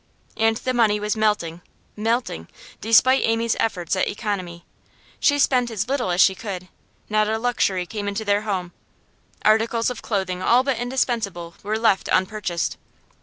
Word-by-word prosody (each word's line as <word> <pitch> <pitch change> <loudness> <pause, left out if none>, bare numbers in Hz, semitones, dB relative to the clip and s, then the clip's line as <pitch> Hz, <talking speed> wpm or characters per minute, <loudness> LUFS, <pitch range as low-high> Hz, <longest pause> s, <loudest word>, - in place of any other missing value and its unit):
And 225 0 +2
the 255 +1 -2
money 220 -4 +3
was 210 +1 -1
melting, 210 -6 0 0.3
melting, 225 - -2 0.3
despite 240 +4 +5
Amy's 225 0 +1
efforts 185 -5 -1
at 185 - +1
economy. 185 -6 -4 0.5
She 285 -2 +3
spent 255 -3 +2
as 220 -1 -3
little 260 -6 -1
as 175 0 0
she 190 - +6
could; 185 -2 -7 0.4
not 215 0 +1
a 220 - 0
luxury 220 -6 0
came 205 +2 -5
into 200 +2 -3
their 205 0 +2
home; 190 -5 -3 0.7
articles 225 +2 +3
of 245 - -7
clothing 190 -4 -2
all 245 +6 +4
but 265 -4 -1
indispensable 230 -9 -2
were 215 +2 -2
left 220 -4 +2
unpurchased. 185 -3 -1
215 Hz, 155 wpm, -22 LUFS, 190-230 Hz, 0.7 s, she